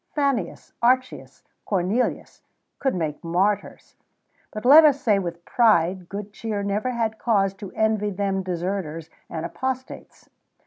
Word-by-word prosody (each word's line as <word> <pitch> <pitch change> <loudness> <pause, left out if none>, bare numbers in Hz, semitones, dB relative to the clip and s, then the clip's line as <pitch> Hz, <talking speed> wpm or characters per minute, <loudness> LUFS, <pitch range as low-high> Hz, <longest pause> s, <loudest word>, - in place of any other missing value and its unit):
Fannius, 275 - -1
Archius, 255 +2 0 0.2
Cornelius, 200 +5 -1 0.4
could 270 -5 0
make 155 -4 -3
martyrs; 190 +5 -1 0.5
but 215 +2 -7
let 295 +5 +9
us 290 -2 +4
say, 210 -6 +2
with 170 -2 -6
pride, 185 -6 +2
good 205 0 -7
cheer 210 -2 -4
never 205 +5 -1
had 225 -3 -2
cause 195 -5 +2
to 195 -1 -9
envy 220 -1 +1
them 195 -1 -1
deserters 175 -3 -4 0.2
and 160 0 -4
apostates. 260 +8 -6
205 Hz, 130 wpm, -24 LUFS, 180-235 Hz, 0.5 s, let